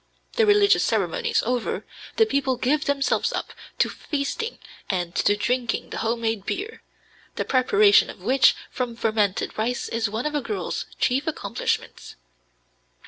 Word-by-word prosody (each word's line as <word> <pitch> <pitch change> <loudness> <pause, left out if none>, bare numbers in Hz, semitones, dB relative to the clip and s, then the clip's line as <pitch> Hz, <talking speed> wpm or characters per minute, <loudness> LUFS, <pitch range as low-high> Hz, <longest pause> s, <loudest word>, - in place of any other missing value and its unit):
The 450 -2 +3
religious 410 -1 +5
ceremonies 465 -2 0
over, 245 -1 -2 0.3
the 445 - +5
people 275 -10 0
give 295 +5 +1
themselves 280 -1 +1
up - - -4 0.2
to - - +3
feasting 310 - -3 0.3
and 175 -3 -1
to 205 - +2
drinking 240 +3 -1
the - - -4
home 230 +1 -1
made 225 -3 -1
beer, 415 - -4 0.5
the - - -2
preparation 215 -6 +4
of - - -9
which 240 +6 +4 0.2
from 245 -2 -3
fermented 215 -4 0
rice 240 +3 -1
is 225 -2 -1
one 220 +5 -3
of 300 - -1
a 295 - 0
girl's 415 - -4
chief 270 +5 +1
accomplishments. 315 - -3
250 Hz, 145 wpm, -24 LUFS, 225-300 Hz, 0.5 s, religious